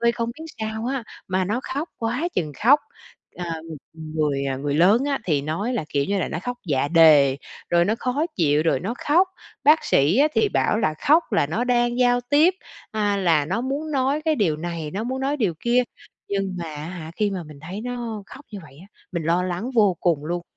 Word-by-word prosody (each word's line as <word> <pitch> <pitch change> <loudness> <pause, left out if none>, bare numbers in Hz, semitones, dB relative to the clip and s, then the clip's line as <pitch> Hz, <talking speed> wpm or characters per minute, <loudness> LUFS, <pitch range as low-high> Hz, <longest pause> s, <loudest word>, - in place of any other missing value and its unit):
Ơi, 235 0 +3
không 235 0 -2
biết 320 - -8 0.2
sao 220 +1 -3
á, 265 -2 -2 0.2
mà 185 0 +1
nó 210 +7 -1
khóc 305 +5 -2
quá 245 +9 -1
chừng 155 -4 -1
khóc. 285 +4 +7 0.6
À, 170 -2 -4
ng 160 -3 -8 0.4
người, 145 -3 0
à, 135 - -1
người 140 +1 -2
lớn 200 - +4
á, 280 -1 0
thì 150 -5 +1
nói 170 - -2
là, 215 - -2
kiểu 140 -1 0
như 200 +4 -1
là, - - -1
nó - - -3
khóc 245 0 -4
dạ 140 -3 +1
đề, 150 -5 +6 0.3
rồi 170 0 +4
nó 210 +4 +1
khó 260 +5 0
chịu, 150 -3 +3
rồi 165 - +2
nó 200 +7 -3
khóc. 350 +6 +4 0.4
Bác 305 +3 +5
sĩ 150 - +3
á, 295 +2 +5
thì 435 - +3
bảo 215 - +1
là 155 -8 +1
khóc 320 +3 +6
là - - +3
nó 210 +11 -1
đang 240 -1 +1
giao 245 -1 +3
tiếp, 295 +8 +3 0.4
à, 205 -2 0
là 165 -6 +2
nó 190 +8 -1
muốn 280 +5 -3
nói 275 +2 +1
cái 315 - +3
điều 175 -9 +1
này, 165 -1 -5
nó 200 +6 -3
muốn 260 +2 -3
nói 275 +2 0
điều 210 - 0
kia. 240 +1 +3 0.5
Nhưng 195 -2 -2
mà, 170 - -4
á 150 0 -6
hả, 165 -3 -7
khi 210 -2 +1
mà 185 -2 -4
mình 150 -2 -12
thấy 180 +7 -7
nó 235 -3 -5
khóc 280 +2 -13
như 205 - -5
vậy 140 -3 -16
á, 190 - -14 0.3
mình 170 -2 -2
lo 170 +3 +1
lắng 185 +7 -3
vô 205 -6 +4
cùng 160 -5 +1
luôn. 175 +2 -3
200 Hz, 230 wpm, -23 LUFS, 160-245 Hz, 0.6 s, khóc